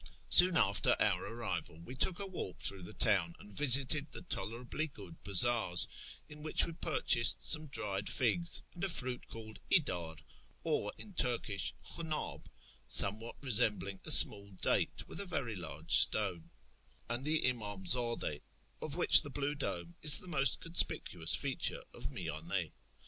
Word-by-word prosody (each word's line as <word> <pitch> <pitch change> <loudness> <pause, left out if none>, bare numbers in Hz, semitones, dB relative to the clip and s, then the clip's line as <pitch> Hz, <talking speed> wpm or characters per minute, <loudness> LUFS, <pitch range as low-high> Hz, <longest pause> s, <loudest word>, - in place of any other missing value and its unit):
Soon 180 -1 +6
after 100 -7 +3
our - - 0
arrival 95 -8 -6
we 120 - -11
took 170 +7 0
a 200 - -3
walk 185 - -8
through 100 -1 -1
the 90 - -11
town, 95 -7 0
and 105 - -16
visited 140 +4 +6
the - - -8
tolerably 125 0 -5
good 100 - -14
bazaars 100 -2 +2 0.4
(in 150 0 -13
which 155 0 +1
we 170 - -9
purchased 155 -8 +3
some 155 -1 +6
dried 100 -7 -2
figs, 170 +8 -1
and 175 - -10
a 195 - -1
fruit 125 -6 -3
called 110 -1 -11
idar, 85 - 0 0.5
or, 105 - -3
in 205 - -12
Turkish, 115 - -2
hliunnOb, 160 -2 -6 0.4
somewhat 110 +4 +1
resembling 105 -6 0
a - - -8
small 100 -1 +4
date, 95 - -2
with - - -8
a 200 - -4
very 125 -10 -3
large 80 -2 -10
stone), 85 -2 +4 0.6
and 120 +2 -5
the 155 +2 -1
imdmzdde, 110 - -3 0.4
of 150 - -6
which 175 - +6
the 145 - -9
blue 140 +1 -4
dome 85 - -6
is 150 -2 +8
the 185 - -5
most 135 -6 -1
conspicuous 105 - -2
feature - - -2
of - - -6
Miyand. 80 +1 -5
115 Hz, 150 wpm, -32 LUFS, 95-150 Hz, 0.6 s, is